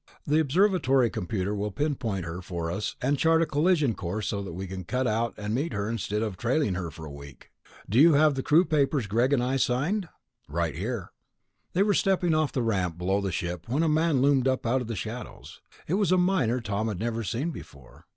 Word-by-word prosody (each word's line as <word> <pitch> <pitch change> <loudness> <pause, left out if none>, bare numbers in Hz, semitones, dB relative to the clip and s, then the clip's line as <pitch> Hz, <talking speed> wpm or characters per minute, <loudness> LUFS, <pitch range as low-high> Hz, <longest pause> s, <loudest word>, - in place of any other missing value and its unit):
The 150 +2 +3
observatory 145 - +3
computer 95 +2 -2
will 105 0 -2
pinpoint 115 - -2
her 85 +2 -5
for 85 -2 -4
us 100 +4 -3
and 140 +2 +1
chart 165 0 +4
a - - +1
collision 150 -3 +2
course 100 +3 -4
so 100 - -2
we 95 +4 -5
can 95 0 -6
cut 125 +8 -1
out 115 0 0
and 105 0 -3
meet 145 +7 -1
her 100 0 -2
instead 110 -1 -2
of 105 -5 -4
trailing 120 - +1
her 90 -2 -3
for 80 +1 -10
a 75 - -8
week. 70 -1 -12 0.4
Do 110 +6 +2
you 160 +2 +7
have 150 +1 +5
the 135 - -2
crew 160 +7 +4
papers 145 -4 +1
Greg 120 +6 +1
and 130 -4 +2
I 130 +2 0
signed?" 160 +10 0 0.4
"Right 85 0 -1
here." 100 - -4 0.6
They 190 - +3
were 205 0 +2
stepping 185 -4 +2
off 155 -2 +1
the 125 - -1
ramp 95 -7 -1
below 95 +3 0
the 100 -1 -2
ship 85 +1 -4
when 140 +7 +1
a - - +2
man 155 -3 +2
loomed 135 -2 +3
up 130 -1 0
out 125 +3 +1
of 120 - -5
the 115 - -3
shadows. 110 +6 -7 0.3
It 160 - -1
was 195 -2 +2
a 185 - +5
miner 170 -10 +2
Tom 110 0 -2
had 105 -4 -3
never 115 +1 -2
seen 125 - -2
before. 70 - -13
120 Hz, 220 wpm, -27 LUFS, 95-150 Hz, 0.6 s, you